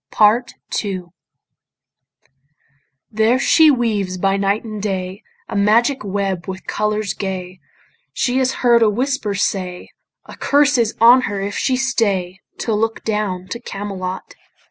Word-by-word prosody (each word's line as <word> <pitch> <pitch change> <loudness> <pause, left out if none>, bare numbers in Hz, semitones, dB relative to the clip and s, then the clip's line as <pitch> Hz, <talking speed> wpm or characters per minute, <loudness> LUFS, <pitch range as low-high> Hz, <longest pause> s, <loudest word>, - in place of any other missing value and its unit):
PART 220 +4 +3 0.3
II 190 -3 -4 2.1
There 220 +3 +3
she 315 +4 +5
weaves 215 -8 0
by 195 +1 +1
night 200 +2 0
and 215 -2 -6
day 190 -1 -3 0.3
A - - -6
magic 230 +6 +2
web 195 -3 -2
with 190 0 -6
colours 210 0 -1
gay. 185 -2 -5 0.5
She 250 - 0
has 260 0 +2
heard 235 -1 +5
a 220 - +5
whisper 245 -2 -1
say, 185 -2 -2 0.4
A - - -11
curse 285 -2 +3
is 230 -1 0
on 240 +3 +7
her 200 -1 -3
if 200 +1 -4
she 260 -2 0
stay 200 -8 0 0.2
To 225 - -1
look 225 +1 -1
down 210 -4 -2
to 235 - -5
Camelot. 195 -4 -6
210 Hz, 140 wpm, -19 LUFS, 195-235 Hz, 2.1 s, on